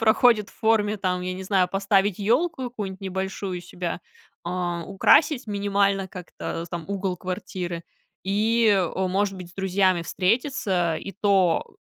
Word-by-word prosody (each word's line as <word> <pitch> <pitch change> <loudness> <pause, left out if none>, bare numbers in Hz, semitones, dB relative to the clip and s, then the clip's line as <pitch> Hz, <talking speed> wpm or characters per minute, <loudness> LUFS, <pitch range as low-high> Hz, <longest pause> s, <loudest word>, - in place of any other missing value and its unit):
проходит 220 -1 +4
в - - -22
форме 215 -1 +2
там, 185 -2 -1
я 185 0 -2
не 185 - -6
знаю, 190 -1 +2
поставить 195 0 +1
ёлку 260 - +1
какую-нибудь 205 -6 -5
небольшую 190 -1 -3
у - - -8
себя, 175 0 -5 0.4
а, 175 -1 -2
украсить 255 +7 +4
минимально 200 -1 +1
как-то 180 -2 -6
там 170 -2 -4
угол 195 -2 -2
квартиры 180 -1 -5 0.4
и, 220 +4 +2
э, 190 -1 +1
может 195 +1 0
быть 180 -2 -8
с - - -21
друзьями 190 -2 +2
встретиться. 185 - 0
И 195 - -6
то 195 -3 +2
195 Hz, 145 wpm, -25 LUFS, 180-205 Hz, 0.4 s, проходит